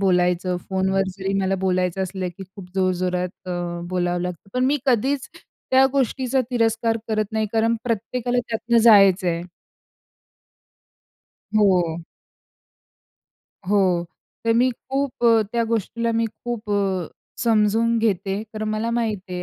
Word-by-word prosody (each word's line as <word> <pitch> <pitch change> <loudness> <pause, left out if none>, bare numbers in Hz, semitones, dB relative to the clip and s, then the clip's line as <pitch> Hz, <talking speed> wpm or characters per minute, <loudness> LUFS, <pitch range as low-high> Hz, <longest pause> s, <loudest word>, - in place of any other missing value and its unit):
बोलायचं. 180 -1 +2
फोनवर 190 0 +1
जरी 195 0 -2
मला 190 0 +1
बोलायचं 185 0 0
असलं 185 0 -3
की 195 - -8
खूप 190 0 -13
जोरजोरात 185 0 -1
अ, - - -2 0.4
बोलावं 175 -1 -1
लागतं. 180 +2 -6
पण 255 0 +2
मी 290 +2 +2
कधीच 265 +3 +1 0.4
त्या 265 +1 +6
गोष्टीचा 265 -1 +1
तिरस्कार 225 -1 +1
करत 215 -1 -1
नाही 220 -1 0
कारण 225 +1 +2
प्रत्येकाला 245 +2 -1
त्यातनं 230 +1 +1
जायचं 200 -4 +6
आहे. 170 0 -1 2.1
हो. 185 -6 +3 1.7
हो. 185 -4 +2 0.4
तर 230 - +3
मी 250 +2 +4
खूप 270 +1 -4
अ, 230 -1 +6
त्या 235 -1 +1
गोष्टीला 230 +1 -1
मी 230 0 +1
खूप 220 0 -6
अ, 195 -4 0 0.4
समजून 225 0 +2
घेते. 200 -2 0
तर 215 0 -3
मला 215 +2 -1
माहीत 230 -3 0
आहे 180 0 -4
215 Hz, 130 wpm, -22 LUFS, 185-230 Hz, 2.1 s, त्या